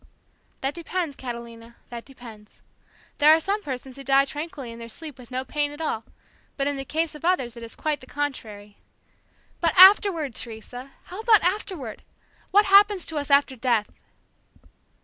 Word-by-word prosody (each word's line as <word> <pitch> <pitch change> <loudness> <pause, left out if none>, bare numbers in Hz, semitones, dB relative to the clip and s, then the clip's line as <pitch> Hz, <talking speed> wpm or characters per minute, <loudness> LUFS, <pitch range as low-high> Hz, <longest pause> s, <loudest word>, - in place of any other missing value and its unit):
"That 270 +2 -1
depends, 340 -2 -3
Catalina, 235 -2 -8
that 235 -1 -8
depends. 230 -6 -14 0.6
There 300 +1 +7
are 320 - +6
some 400 +5 -2
persons 265 -4 -7
who 275 - -9
die 275 +1 +4
tranquilly 290 -4 -7
in 230 - -10
their 230 0 -9
sleep 290 +2 -9
with 245 - -13
no 260 +1 -3
pain 290 +2 -1
at 295 - -11
all, 230 -8 -3 0.5
but 275 - 0
in 285 0 -1
the 270 - -4
case 320 +3 -2
of 300 - -12
others 265 -10 0
it 235 - -10
is 230 0 -10
quite 305 -2 -2
the 255 - -14
contrary." 215 -9 -5 0.8
"But 335 -2 +1
afterward, 370 - +7
Teresa! 245 +4 -8
How 370 - -10
about 440 -2 +4
afterward? 360 - -2 0.5
What 410 +2 +5
happens 400 -1 +5
to 320 - -6
us 285 - -6
after 280 -1 +4
death?" 235 -4 0
275 Hz, 170 wpm, -24 LUFS, 240-330 Hz, 0.8 s, There